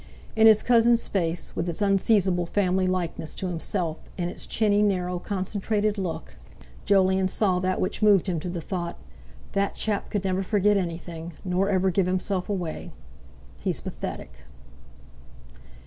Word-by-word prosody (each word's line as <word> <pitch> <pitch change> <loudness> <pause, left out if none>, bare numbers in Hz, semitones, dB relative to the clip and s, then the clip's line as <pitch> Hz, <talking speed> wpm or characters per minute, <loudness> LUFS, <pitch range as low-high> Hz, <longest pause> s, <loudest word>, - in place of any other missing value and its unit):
In 220 0 +6
his 215 -1 +6
cousin's 235 -1 +4
face, 170 -3 -2
with 170 +1 -1
its 165 - -5
unseizable 195 -3 +2
family 185 -1 +1
likeness 175 -3 -2
to 195 - -4
himself, 170 -1 -2 0.2
and 175 -1 -2
its - - -4
chinny, 210 -2 +2
narrow, 180 -3 0
concentrated 205 +2 -1
look, 180 -4 -5 0.5
Jolyon 190 -1 +3
saw 185 -1 +1
that 185 0 0
which 185 - -2
moved 205 -3 +5
him 175 -3 0
to 175 - -5
the 175 -1 -4
thought: 170 0 -4 0.5
"That 200 0 0
chap 210 -2 -2
could 205 -2 -2
never 190 0 0
forget 205 +1 +2
anything—nor 175 +1 -2
ever 190 -1 +2
give 185 0 +1
himself 185 +1 -1
away. 180 -3 -4 0.7
He's - - -1
pathetic!" - - -6
185 Hz, 145 wpm, -26 LUFS, 180-205 Hz, 0.7 s, In